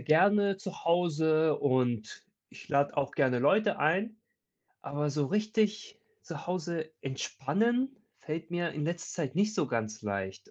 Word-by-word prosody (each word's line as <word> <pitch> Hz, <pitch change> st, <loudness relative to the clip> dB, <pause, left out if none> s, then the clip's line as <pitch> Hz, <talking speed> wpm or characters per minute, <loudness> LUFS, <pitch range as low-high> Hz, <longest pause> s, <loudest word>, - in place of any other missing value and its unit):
gerne 195 Hz, +8 st, +4 dB
zu 190 Hz, -1 st, -8 dB
Hause, 160 Hz, -2 st, +3 dB
und 125 Hz, -5 st, 0 dB, 0.3 s
ich -, -, -13 dB
lade 140 Hz, +1 st, +2 dB
auch 140 Hz, 0 st, 0 dB
gerne 130 Hz, -4 st, +2 dB
Leute 200 Hz, -, +3 dB
ein. 190 Hz, +9 st, +1 dB, 0.7 s
Aber 145 Hz, +1 st, -2 dB
so 145 Hz, 0 st, 0 dB
richtig 215 Hz, -, 0 dB, 0.2 s
zu -, -, -8 dB
Hause 170 Hz, -3 st, -3 dB
entspannen 225 Hz, -, -1 dB, 0.2 s
fällt 160 Hz, +2 st, -5 dB
mir 175 Hz, -1 st, -1 dB
in 150 Hz, -, -4 dB
letzter 170 Hz, +1 st, -3 dB
Zeit 135 Hz, -4 st, -3 dB
nicht 210 Hz, +4 st, +2 dB
so 150 Hz, -, +1 dB
ganz 110 Hz, -3 st, -3 dB
leicht. 100 Hz, -1 st, -4 dB
160 Hz, 145 wpm, -30 LUFS, 135-195 Hz, 0.7 s, gerne